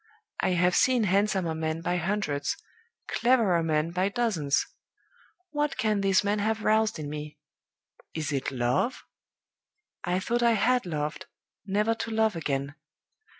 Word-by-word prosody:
I 185 - +1
have 180 0 +2
seen 255 -3 +4
handsomer 195 -3 +1
men 160 0 -2
by 175 +1 0
hundreds, 175 -6 -1 0.5
cleverer 230 -9 +3
men 160 0 0
by 185 +2 +1
dozens. 200 - 0 0.9
What 295 -1 -1
can 215 -2 +1
this 195 0 +3
man 205 +1 0
have 220 +1 -1
roused 220 0 +2
in 150 -2 -5
me? 150 0 -6 0.8
Is 155 -1 -2
it 135 -2 -1
Love? 125 - 0 1.0
I 180 +1 0
thought 240 +5 -1
I 235 -1 +4
had 245 0 +2
loved, 150 -2 -3 0.4
never 210 +3 +2
to 225 - -5
love 220 -2 +1
again. 140 -3 -2
190 Hz, 140 wpm, -27 LUFS, 160-220 Hz, 1.0 s, seen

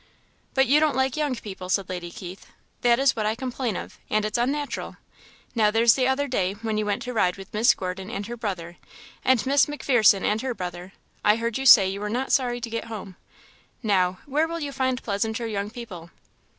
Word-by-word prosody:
"But 265 0 +4
you 280 +4 +4
don't 310 -2 +2
like 265 -1 +1
young 295 -4 0
people," 190 -5 -8
said 195 0 +1
Lady 175 -1 -5
Keith 180 +2 -10 0.3
"that 240 -1 +4
is 270 -1 +3
what 215 -1 -1
I 215 - 0
complain 250 -3 -3
of; - - -7
and 215 0 +1
it's 215 +3 -1
unnatural. 280 +4 -2 0.6
Now 220 -3 +3
there's 225 +1 +5
the 255 -2 +1
other 275 +2 +1
day, 195 -7 0
when 215 0 -3
you 210 - -1
went 205 +4 -1
to 250 -2 -5
ride 180 -5 +1
with 195 - -11
Miss 220 +3 +4
Gordon 190 +1 -5
and 200 -2 -4
her 240 +3 -6
brother, 180 -7 -5 0.5
and 255 -4 +3
Miss 280 +3 +4
M'Pherson 245 -9 +3
and 215 +1 +1
her 260 -2 -3
brother 180 0 -6 0.3
I 210 - +5
heard 230 +1 -2
you 270 - +1
say 200 -6 +9
you 195 +1 -3
were 210 - -3
not 250 +5 -2
sorry 245 -2 +2
to 230 - -4
get 230 - -3
home. 205 -4 -8 0.7
Now, 185 -4 +2
where 300 +3 +1
will 335 0 -4
you 290 -3 -4
find 260 -2 -1
pleasanter 220 +2 -2
young 205 -2 -3
people?" 205 -8 -9
225 Hz, 215 wpm, -25 LUFS, 200-260 Hz, 0.7 s, say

